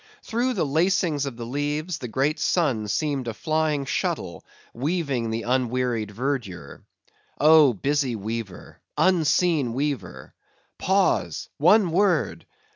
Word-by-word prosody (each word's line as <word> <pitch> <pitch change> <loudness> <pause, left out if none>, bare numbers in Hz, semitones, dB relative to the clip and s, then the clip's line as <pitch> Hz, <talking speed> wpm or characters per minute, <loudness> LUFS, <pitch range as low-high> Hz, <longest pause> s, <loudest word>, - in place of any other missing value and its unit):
Through 245 +3 -1
the - - 0
lacings 155 -1 +1
of 125 -4 -6
the 120 - -6
leaves, 145 +6 -3
the 125 - -5
great 135 +7 0
sun 135 -12 +1
seemed 140 +1 -1
a 115 - -4
flying 155 0 0
shuttle - - -3 0.3
weaving 140 -3 -1
the 115 +1 -3
unwearied 125 -3 0
verdure. 105 - -4 0.6
Oh, 150 -3 +6
busy 135 +3 -1
weaver! 110 -2 -6 0.2
unseen 165 -6 +2
weaver!—pause!—one 150 - 0
word! 190 +2 +1
140 Hz, 110 wpm, -24 LUFS, 115-160 Hz, 0.6 s, Oh